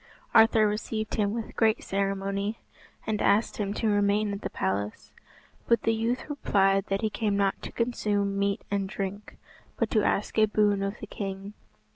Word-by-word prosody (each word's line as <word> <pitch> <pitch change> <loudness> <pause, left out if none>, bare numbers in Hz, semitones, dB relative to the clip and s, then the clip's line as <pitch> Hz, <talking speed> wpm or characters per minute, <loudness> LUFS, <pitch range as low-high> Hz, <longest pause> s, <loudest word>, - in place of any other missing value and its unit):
Arthur 220 -1 +6
received 215 +1 -3
him 205 -2 +1
with 225 0 -5
great 220 -1 +2
ceremony, 195 +2 -1 0.5
and 215 -1 -1
asked 215 +2 +2
him 200 -2 -1
to 225 - -1
remain 205 0 +2
at 200 - -5
the - - -3
palace; 100 +2 -3 0.6
but 235 - +3
the 225 - +2
youth 230 +3 -1
replied 195 -9 +2
that 195 0 -1
he 220 - +1
came 210 -2 0
not 195 -1 +1
to - - -7
consume 205 -4 -1
meat 200 0 0
and 195 -1 -1
drink, 200 +1 -5 0.4
but - - 0
to - - +3
ask - - 0
a 215 - +5
boon 210 -1 +2
of 195 +1 -2
the - - -4
king. 195 0 -6
205 Hz, 175 wpm, -27 LUFS, 195-220 Hz, 0.6 s, Arthur